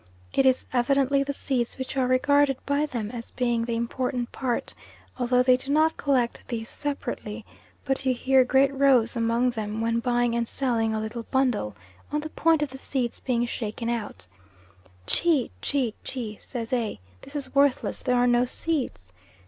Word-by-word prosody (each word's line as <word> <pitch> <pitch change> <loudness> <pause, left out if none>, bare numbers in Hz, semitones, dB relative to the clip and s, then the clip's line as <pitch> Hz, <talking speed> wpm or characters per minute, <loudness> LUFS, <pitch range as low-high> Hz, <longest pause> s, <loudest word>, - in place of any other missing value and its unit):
It 270 - +4
is 260 -1 +3
evidently 275 +2 +3
the 280 +1 -1
seeds 255 -4 -2
which 260 0 -5
are 260 -2 +2
regarded 285 +1 +3
by 285 +1 +1
them 225 -6 -4
as 235 -2 -7
being 240 -2 0
the 230 0 -2
important 245 +1 -2
part, 250 -3 -2 0.5
although 250 0 +3
they 255 0 +6
do 265 +2 -4
not 315 +2 +3
collect 255 -5 0
these 225 -2 -4
separately; 240 -6 -4 0.4
but 270 -1 0
you 260 - +2
hear 260 +1 +4
great 270 +2 +3
rows 265 -4 +4
among 235 +2 +2
them 215 -2 -4
when 230 +1 +1
buying 240 0 +1
and 235 0 0
selling 225 -5 0
a - - -1
little 220 +2 -5
bundle, 245 - +1 0.4
on 300 0 0
the 310 - -6
point 325 -2 +3
of 285 - -4
the 265 - -9
seeds 255 -4 -2
being 240 -2 0
shaken 230 -1 -4
out, 210 - -4 0.8
"Chi! 305 - +2
Chi! 260 -6 0
Chi!" 225 -5 -5
says 235 -2 -5
A., 230 - -1 0.2
"this 280 - -11
is 270 -3 -4
worthless, 280 -1 +2
there 250 -1 +1
are 245 - +4
no 240 0 +4
seeds." 250 - -2
250 Hz, 175 wpm, -26 LUFS, 235-275 Hz, 0.8 s, they